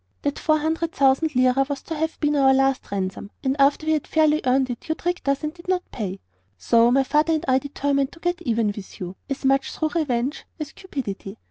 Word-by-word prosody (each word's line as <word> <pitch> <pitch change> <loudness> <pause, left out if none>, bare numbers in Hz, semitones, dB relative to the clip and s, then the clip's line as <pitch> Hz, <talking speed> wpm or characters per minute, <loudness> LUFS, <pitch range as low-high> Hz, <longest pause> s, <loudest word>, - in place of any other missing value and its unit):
That 285 0 -1
four 310 -1 +3
hundred 320 +2 -1
thousand 275 +3 +2
lira 255 +1 +4
was 280 -1 -4
to 330 - -5
have 320 +1 -2
been 295 -1 +1
our 265 -2 +5
last 270 0 +1
ransom, 195 0 -3
and 265 0 +1
after 280 +3 +3
we 315 - +1
had 305 -3 -1
fairly 310 -1 +3
earned 260 0 +2
it 245 - -8
you 315 - +1
tricked 355 -3 -2
us 275 +2 0
and 305 0 -2
did 345 0 -16
not 365 -1 +1
pay. 195 -4 -4 0.4
"So 230 - +4
my 270 +2 +4
father 300 +4 +2
and 310 - -1
I 260 0 +4
determined 280 0 -1
to 340 - -15
get 350 +1 -1
even 230 -1 0
with 200 -3 -10
you, 180 0 -6
as 275 0 -4
much 270 0 +2
through 315 - -1
revenge 285 -5 -1
as 300 -2 -5
cupidity. 225 - -6
275 Hz, 225 wpm, -23 LUFS, 255-310 Hz, 0.4 s, our